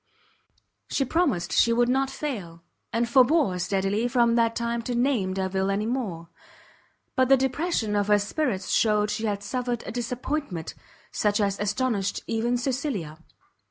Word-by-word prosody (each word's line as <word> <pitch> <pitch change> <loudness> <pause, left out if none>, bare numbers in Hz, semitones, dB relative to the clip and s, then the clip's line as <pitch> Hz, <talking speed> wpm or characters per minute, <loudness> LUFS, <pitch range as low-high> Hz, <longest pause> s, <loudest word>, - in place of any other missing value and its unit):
She 275 - 0
promised 230 - 0
she 230 - +4
would 240 +1 +3
not 265 +2 +1
fail; 190 - -5 0.3
and 235 +1 0
forbore 260 - +4
steadily 195 +5 0
from 235 -1 +3
that 230 -1 +2
time 235 0 -1
to 245 +1 -3
name 235 -7 +1
Delvile 190 0 -1
any 200 +2 0
more: 205 -9 -3 0.9
but 260 0 +3
the 270 - +7
depression 265 -4 -1
of 205 -1 +1
her 210 0 +5
spirits 205 -1 -2
shewed 210 -1 +2
she 220 +1 -2
had 205 -1 -2
suffered 245 +2 -2
a - - -5
disappointment 245 - -3 0.4
such 210 0 +1
as 200 -1 0
astonished 205 -1 -1
even 235 +2 0
Cecilia. 245 - -3
230 Hz, 150 wpm, -26 LUFS, 200-255 Hz, 0.9 s, the